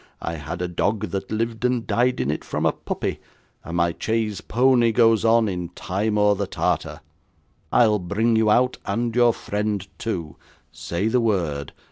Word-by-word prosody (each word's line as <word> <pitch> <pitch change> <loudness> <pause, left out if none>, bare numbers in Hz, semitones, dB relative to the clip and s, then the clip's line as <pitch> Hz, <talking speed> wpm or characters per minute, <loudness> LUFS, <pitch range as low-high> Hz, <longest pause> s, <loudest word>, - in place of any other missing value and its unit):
I 80 - -3
had 85 +4 -5
a - - -1
dog 100 +3 -1
that 95 -1 -4
lived 115 +1 -2
and 125 -2 +1
died 125 +1 +1
in 65 +3 0
it 75 - -4
from - - -3
a - - +4
puppy; - - -4 0.4
and 85 +1 -5
my 85 0 +2
chaise 110 -3 -1
pony 120 -1 +3
goes 115 -1 +4
on, 115 0 +4
in 90 -3 -3
Timour 105 +2 +1
the 100 0 -2
Tartar. - - -2 0.7
I'll 110 -3 +4
bring 110 +6 +1
you 110 -1 +3
out, 125 +4 +3
and 120 0 -1
your 120 -1 +5
friend 105 -3 -3
too. 85 -9 -4 0.3
Say 85 +5 -3
the 120 +2 +2
word. 85 -11 -1
105 Hz, 170 wpm, -23 LUFS, 90-115 Hz, 0.7 s, your